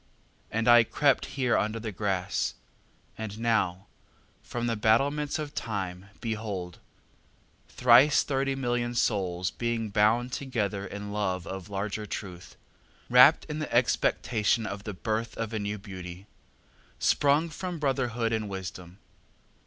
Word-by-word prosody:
And 115 +2 -1
I 120 -1 +8
crept 140 +4 +2
here 125 -3 +2
under 110 +2 0
the 110 -1 -5
grass. 95 -2 -1 0.6
And 110 -2 -5
now 105 -5 0 0.6
from 120 0 -4
the 115 -1 0
battlements 140 +8 +2
of 150 -2 -5
time, 95 -7 -4
behold: 105 -6 -4 0.9
Thrice 130 +4 +5
thirty 135 -1 -1
million 120 -2 -1
souls 95 -6 0
being 115 -2 -2
bound 110 +5 +3
together 110 -7 -2
In 100 +1 -7
the - - -6
love 95 -4 -1
of 95 -1 -7
larger 105 +2 -3
truth, 90 -3 -7 0.6
Rapt 125 +5 +7
in 150 0 -5
the 155 - -4
expectation 115 -1 +2
of 100 -1 -6
the 105 - -5
birth 110 +4 -3
Of 115 0 -3
a 110 - -1
new 105 +1 -3
Beauty, 95 -2 -9 0.7
Sprung 145 +4 +3
from 180 +2 -5
Brotherhood 125 -5 0
and 110 -2 -2
Wisdom. 90 -2 -7
110 Hz, 135 wpm, -28 LUFS, 100-125 Hz, 0.9 s, I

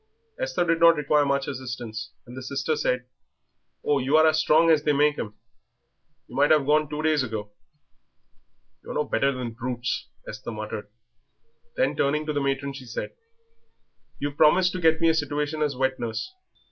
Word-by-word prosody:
Esther - - 0
did 165 -1 +1
not 170 0 +7
require 150 0 +2
much 140 0 0
assistance, 120 -5 -5 0.2
and 125 - -11
the 130 - -6
sister 140 +4 -2
said, 125 -3 -1 0.8
"Oh, 145 -1 +2
you 135 +4 +2
are 155 - +6
as 155 0 +4
strong 160 +1 +4
as 155 -2 +4
they 150 0 +1
make 145 +1 +2
'em; 105 -1 -5 0.9
you - - -12
might 145 +2 +4
have 150 -3 +4
gone 150 0 +2
two 150 +1 -4
days 155 -2 +3
ago." 110 -4 -4 1.3
"You're - - -7
no 150 - +1
better 135 -1 +1
than 125 -3 -4
brutes," 120 +1 -3 0.2
Esther 110 +2 -7
muttered. 110 -1 -6 0.9
Then, - - +1
turning 150 +2 +1
to 150 - -2
the 145 - 0
matron, 140 0 -1
she 135 -2 -9
said, 115 - -5 1.1
"You 145 0 -2
promised 160 +5 +4
to 185 - -5
get 160 -1 +3
me 165 - +5
a - - +4
situation 150 0 -2
as 145 -3 0
wet 130 0 0
nurse." 120 - -4
145 Hz, 180 wpm, -25 LUFS, 130-155 Hz, 1.3 s, not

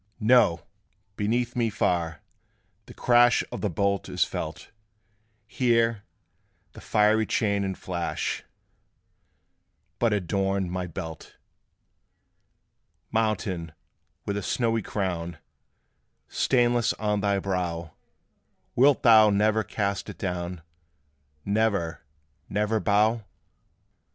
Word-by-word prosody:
"No: 110 -7 +4 0.5
beneath 120 +4 -1
me 120 -2 +1
far, 85 -6 -1 0.7
the - - -11
crash 120 0 +4
Of - - -5
the 105 - 0
bolt 100 +3 -1
is - - +2
felt: - - -6 0.7
Here, 115 -2 +1 0.7
the - - -13
fiery 110 +1 +2
chain 100 -3 +1
and 95 -1 -3
flash 85 -2 -3 1.6
But 115 -2 +2
adorn 95 -1 0
my 90 0 -3
belt." 80 -2 -8 1.8
Mountain, 95 -7 -1 0.5
with 100 0 -2
a - - -2
snowy 115 +1 0
crown 85 -5 -3 0.9
Stainless 120 -2 +2
on 105 -1 -1
thy 100 -1 +1
brow, 90 -4 -3 0.8
Wilt 140 +2 +4
thou 110 -3 +7
never 105 +2 +2
cast 100 -1 -2
it - - -9
down 90 -2 -4 0.8
Never, 100 -6 0 0.5
never 105 +2 0
bow? 110 +2 +2
100 Hz, 95 wpm, -26 LUFS, 90-110 Hz, 1.8 s, thou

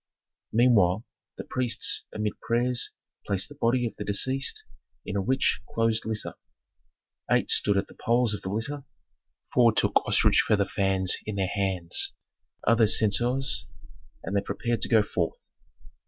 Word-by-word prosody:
Meanwhile, 110 -4 +3 0.3
the - - -5
priests, 125 -2 -1
amid 105 -1 -2
prayers, 120 +1 0 0.4
placed 100 +2 -1
the - - -10
body 125 -2 +1
of 115 - -4
the 105 - -4
deceased 130 +7 -1 0.4
in 100 - -5
a 100 - +1
rich 130 +6 +1
closed 115 -1 0
litter. 110 -1 -4 1.0
Eight - - +2
stood 100 -1 +3
at 100 - +1
the - - -16
poles 120 -1 +1
of 105 - -5
the 95 - -5
litter; 115 +8 -3 0.7
four 120 -2 +5
took - - +2
ostrich - - +4
feather 100 -2 +3
fans 95 -1 0
in 105 - -3
their 95 -1 0
hands, 95 -4 0 0.5
others 115 -1 +5
censers, 120 +5 +1 0.6
and 100 - -4
they 100 - +3
prepared 120 +2 -2
to - - -1
go 110 -3 +5
forth. - - -2
110 Hz, 150 wpm, -27 LUFS, 100-120 Hz, 1.0 s, four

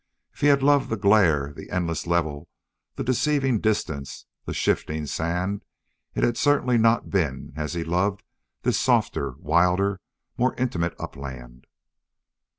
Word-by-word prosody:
If - - -18
he 145 - +4
had 140 -2 +4
loved 145 -1 +4
the 110 - -1
glare, 85 -9 +3
the - - -10
endless 85 -2 -2
level, 80 -3 -1 0.5
the - - -3
deceiving 130 -1 +1
distance, 80 -11 -2 0.2
the - - -4
shifting 75 0 0
sand, 90 +7 -2 0.5
it - - 0
had 120 - +2
certainly 130 -4 +3
not 115 +1 +2
been 80 -9 -1
as 75 +2 -3
he 85 - -1
loved 90 +5 0 0.4
this - - +1
softer, 70 -3 +1
wilder, 90 +4 +2 0.4
more 125 +2 +2
intimate 90 -10 -1
upland. 65 -2 -8
90 Hz, 140 wpm, -25 LUFS, 80-115 Hz, 0.5 s, he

